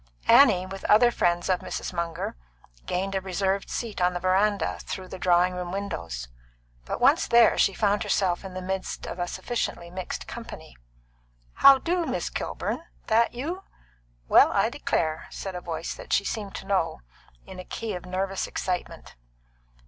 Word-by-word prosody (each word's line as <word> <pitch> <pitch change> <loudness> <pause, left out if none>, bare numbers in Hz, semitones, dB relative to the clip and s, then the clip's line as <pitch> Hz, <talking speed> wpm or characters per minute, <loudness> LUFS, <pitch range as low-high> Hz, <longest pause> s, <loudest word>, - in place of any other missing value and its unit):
Annie, 210 -10 +6
with 195 +1 -8
other 240 +3 +6
friends 175 -5 +1
of 185 -1 +2
Mrs. - - -5
Munger, 170 - -3 0.5
gained 190 +2 -1
a 190 - 0
reserved 190 +1 -1
seat 225 -5 -4
on 180 0 +2
the - - -1
veranda 185 - +1
through 185 -1 -6
the 190 - -8
drawing 180 0 +3
room 180 -1 -4
windows; 85 - -4 0.6
but - - -4
once 275 +6 +4
there, 235 -1 +6
she 195 - +3
found 205 -1 +2
herself 180 -2 0
in 190 -1 -8
the 185 - -5
midst 190 0 -4
of 180 - -6
a 175 - -1
sufficiently 175 -6 -3
mixed 185 0 -5
company. - - -9 0.8
"How 275 -1 +8
do, 340 +4 -1
Miss - - -2
Kilburn? - - -3 0.3
That 230 +2 +3
you? 330 +10 -4 0.7
Well, - - +6
I - - +2
declare!" 155 0 -1
said 195 - -6
a 180 - -5
voice 170 -1 -4
that - - -11
she 200 - +3
seemed 205 -3 -4
to - - -7
know, 185 - 0 0.4
in 185 - -10
a - - -6
key 225 +3 -5
of 180 0 -7
nervous 190 +1 -2
excitement. 180 -1 -4
190 Hz, 170 wpm, -26 LUFS, 180-210 Hz, 0.8 s, How